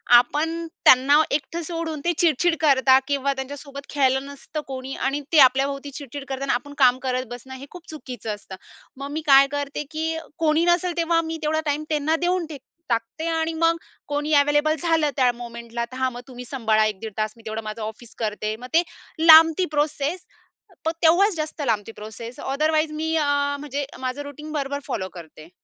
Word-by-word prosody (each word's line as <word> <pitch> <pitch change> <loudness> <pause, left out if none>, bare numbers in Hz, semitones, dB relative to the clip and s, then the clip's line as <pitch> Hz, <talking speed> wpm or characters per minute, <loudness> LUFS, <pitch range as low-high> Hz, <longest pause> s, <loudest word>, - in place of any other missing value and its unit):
आपण 320 +7 +2 0.2
त्यांना 275 +4 +7
एकटं 310 +4 -2
सोडून 330 -2 -4
ते 345 - +3
चिडचिड 335 +1 +3
करता 265 -3 +5
किंवा 280 -1 0
त्यांच्यासोबत 280 +1 -8
खेळलं 265 -1 +1
नसतं 280 +2 -7
कोणी 265 0 -6
आणि 275 +2 -1
ते 310 - +7
आपल्याभोवती 275 +2 +3
चिडचिड 280 0 -8
करताना, 270 0 -1
आपण 285 +4 -4
काम 255 -1 +5
करत 255 0 -1
बसणं 260 +2 -8
हे 270 +2 -9
खूप 350 -2 -12
चुकीचं 245 -8 -6
असतं. 195 -2 -11 0.4
मग 280 +1 -6
मी 315 +1 -3
काय 275 0 +7
करते? 285 0 -3
की 320 +1 -2 0.2
कोणी 320 +1 +2
नसेल 345 0 +1
तेव्हा 335 0 +2
मी 325 0 -4
तेवढा 310 +1 +1
टाईम 295 +1 -1
त्यांना 305 +1 +1
देऊन 360 -1 +1
टेक 285 -4 -8 0.3
टाकते 230 +8 -2
आणि 325 0 0
मग 330 +1 +2 0.3
कोणी 295 +1 -1
अवेलेबल 295 +2 +2
झालं 325 -3 +2
त्या 250 -2 +4
मूव्हमेंटला 235 0 -6
तर 255 - -8
हा 260 0 +1
मग 245 0 -9
तुम्ही 250 -1 -9
सांभाळा 220 -5 +1
1 210 -3 -2
दीड 220 -2 -6
तास 215 0 -1
मी 225 - -17
तेवढं 220 0 -4
माझं 215 +1 -6
ऑफिस 220 +2 -8
करते. 215 0 -2
मग 250 +3 -10
ते 340 +2 +5 0.4
लांबती 325 +2 +8
प्रोसेसपण 320 - -4
तेव्हाच 360 +4 +5
जास्त 310 -1 -4
लांबती 225 -2 -1
प्रोसेस 225 +3 -9
ओदरवाईज 310 +3 0
मी 320 +1 -2
अ, 305 -2 +2 0.3
म्हणजे 285 -1 -4
माझं 260 +2 -3
रुटीन 300 +2 -9
बरोबर 285 -1 -2
फॉलो 190 -1 -3
करते. 160 -2 -12
285 Hz, 180 wpm, -23 LUFS, 250-315 Hz, 0.4 s, लांबती